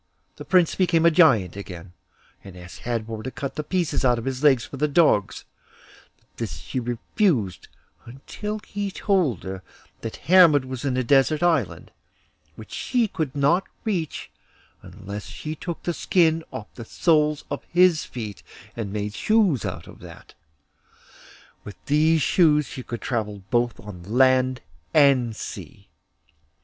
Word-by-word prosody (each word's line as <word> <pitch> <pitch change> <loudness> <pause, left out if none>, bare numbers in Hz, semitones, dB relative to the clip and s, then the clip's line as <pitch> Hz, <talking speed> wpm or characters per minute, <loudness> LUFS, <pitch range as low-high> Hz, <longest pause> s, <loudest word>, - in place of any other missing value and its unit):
The - - -9
prince 180 -3 +3
became 170 -3 +2
a 170 - +6
Giant 130 - +4
again, 90 -3 -9 0.5
and 95 -2 -12
asked 90 +1 -11
Hadvor 115 -2 -4
to 130 - -5
cut 140 +1 -5
the 150 - -4
pieces 175 -1 -1
out 125 -2 +3
of 115 - -6
his 135 -1 -3
legs 130 -5 +4
for 140 - -9
the 150 +3 +1
dogs; 145 - +2 0.9
but 115 -3 -3
she 85 +10 -5
refused 120 - -1 0.4
until 210 - -6
he 205 -1 -3
told 185 - 0
her 95 0 -6 0.4
that 115 - -6
Hermod 165 -5 +6
was 130 +1 -6
in 130 -2 0
a 130 - +1
desert 140 +6 +3
island, 160 - 0 0.6
which 110 - -12
she 245 -3 0
could 155 -8 -3
not 145 +7 +2 0.2
reach 180 -9 -3 0.5
unless 100 0 -9
she 155 - -6
took 165 +2 -6
the 175 - -1
skin 165 -2 +2
off 105 - -8
the 120 - -9
soles 150 +3 +1
of - - -4
his 175 -2 +3
feet 110 -6 -7 0.3
and 105 -4 -4
made 105 0 -3
shoes 200 - +2
out - - -5
of - - -14
that; - - -13 1.3
with 105 - -9
these 155 +1 +3
shoes 150 -4 +3
she 130 - -8
could 120 -2 -7
travel 105 -5 -3
both 120 -1 +1
on 100 -4 -10
land 130 +5 +2 0.3
and 135 -6 +4
sea. - - -9
135 Hz, 150 wpm, -24 LUFS, 110-165 Hz, 1.3 s, a